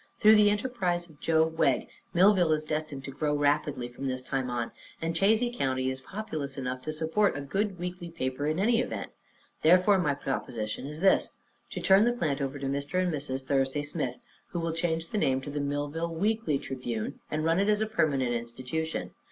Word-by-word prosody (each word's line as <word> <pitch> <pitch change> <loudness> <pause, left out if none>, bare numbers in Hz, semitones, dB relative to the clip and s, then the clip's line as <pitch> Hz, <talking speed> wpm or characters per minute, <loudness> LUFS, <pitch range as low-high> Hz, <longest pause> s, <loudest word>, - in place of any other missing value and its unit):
Through 215 0 +7
the 210 -1 +6
enterprise 205 -6 -1
of 155 -3 -19
Joe 160 -1 +3
Wegg, 160 0 +1 0.2
Millville 180 -2 +5
is 155 0 0
destined 155 -3 -3
to 135 - -6
grow 150 +2 0
rapidly 145 -3 +1
from 125 +3 -6
this 130 -1 -2
time 130 -1 -2
on, 120 -1 -2 0.3
and 165 +1 -2
Chazy 220 +7 +2
County 130 - 0
is 130 0 -6
populous 155 -7 -5
enough 130 -1 -3
to 155 - -4
support 160 +5 +1
a - - -3
good 195 +7 -1
weekly 180 0 -5
paper, 145 -3 -2
in 155 +1 0
any 225 +5 +3
event. - - -4 0.5
Therefore, 185 +4 +5
my 145 -6 +1
proposition 120 -3 -3
is 150 +2 -7
this: 195 - +4 0.4
To - - -5
turn 195 +3 +6
the 240 - +3
plant 150 - -1
over 135 +1 -2
to 140 - -5
Mr. 140 +5 -1
and 180 -2 +1
Mrs. 135 -2 -2
Thursday 135 +1 +1
Smith, 145 -4 -3 0.3
who 175 - -4
will 165 -1 -1
change 165 -1 -1
the 210 - -1
name 130 -8 +2
to 145 - -6
the 145 - -2
Millville 145 +4 -2
Weekly 210 -3 +1
Tribune 125 -2 -4
and 155 +1 -1
run 165 +2 +3
it 200 +2 +2
as 210 0 +3
a - - +2
permanent 140 - +1
institution. 125 +7 -3
155 Hz, 200 wpm, -29 LUFS, 135-180 Hz, 0.5 s, Through